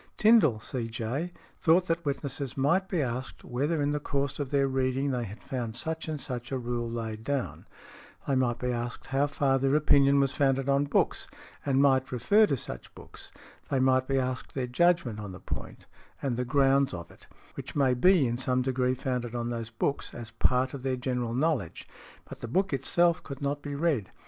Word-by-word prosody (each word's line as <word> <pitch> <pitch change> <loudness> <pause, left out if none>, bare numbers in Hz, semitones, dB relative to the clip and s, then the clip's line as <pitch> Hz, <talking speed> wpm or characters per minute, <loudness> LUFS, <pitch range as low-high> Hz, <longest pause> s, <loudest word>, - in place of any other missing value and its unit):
Tindal, 210 - +5
C.J., 120 +7 -3 0.3
thought 175 +2 +4
that 170 -1 -1
witnesses 140 -2 -3
might 170 +8 +2
be 170 -6 +1
asked 125 +1 -5
whether 145 +6 -1
in 145 0 +1
the 150 - -1
course 140 0 -2
of 140 -3 -2
their 140 -1 +2
reading 130 +1 0
they 125 -2 -1
had 105 +2 -10
found 120 -4 -4
such 160 +4 -3
and 155 -2 -3
such 125 -1 -6
a 135 - 0
rule 120 -1 -3
laid 110 -2 -5
down; 140 0 -3 0.6
they 140 - +1
might 125 -3 +1
be 125 +1 -2
asked 120 0 -4
how 135 +2 +1
far 140 -2 +1
their 135 +2 +2
opinion 140 -2 +5
was 135 -1 +2
founded 135 -1 +1
on 140 +1 +3
books, 145 - 0 0.4
and 135 -1 +3
might 130 -2 +3
refer 200 - +4
to 140 - 0
such - - -8
books; - - -13 0.4
they 135 - +1
might 130 0 +3
be 135 - +1
asked 130 0 -3
their 130 -2 -1
judgment 125 -3 +2
on 105 -3 -6
the 90 - -9
point, - - -7 0.3
and 135 -4 -1
the 125 +1 -2
grounds 135 -3 +3
of 85 -1 -8
it, - - -18 0.3
which - - -8
may 135 -3 +3
be 170 +4 +4
in 120 0 -1
some 130 -1 +1
degree 130 0 +1
founded 125 -2 -3
on 120 0 -2
these 115 -1 -4
books, 140 +5 -2
as 115 -1 -8
a 115 - -18
part 130 +1 +3
of 140 - -6
their 130 -1 -1
general 125 -2 -2
knowledge, 140 - -1 0.4
but - - -9
the - - -6
book 185 - 0
itself 170 +5 +2
could 140 -3 -8
not 145 +1 -1
be 145 -1 -5
read. 140 - 0
135 Hz, 205 wpm, -28 LUFS, 120-145 Hz, 0.6 s, Tindal